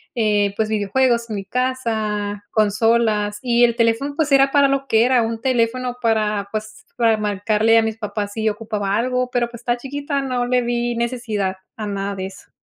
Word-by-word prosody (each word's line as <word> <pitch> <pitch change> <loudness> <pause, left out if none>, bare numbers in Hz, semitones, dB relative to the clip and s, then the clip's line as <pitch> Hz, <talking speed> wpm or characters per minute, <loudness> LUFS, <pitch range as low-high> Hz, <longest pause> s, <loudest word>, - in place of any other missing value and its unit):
eh, 205 -3 +1
pues 220 -1 0
videojuegos 235 +3 +1
en 215 - -3
mi 195 - -6
casa, 220 -5 -2
consolas 215 -1 +2
y 240 -1 +2
el 235 - 0
teléfono, 230 +5 +1
pues 305 -3 0
era 275 0 +5
para 280 -1 +5
lo 275 0 -1
que 225 -1 +4
era 250 -2 +3
un 225 0 -3
teléfono 250 0 0
para, 215 -3 +1
pues, 215 0 -6
para 230 -2 +4
marcarle 210 +2 +2
a 225 - +4
mis 220 0 -2
papás 205 -1 -4
si 220 -1 0
ocupaba 210 -2 -2
algo, 250 +1 0
pero 240 -1 0
pues 235 -1 -11
estaba 240 0 0
chiquita. 280 +2 -3
No 250 -2 -1
le 250 0 +2
vi 240 0 -1
necesidad 230 -5 -2 0.2
a 215 - -4
nada 200 0 -3
de 190 - -4
eso. 195 - -14
230 Hz, 190 wpm, -20 LUFS, 210-245 Hz, 0.2 s, era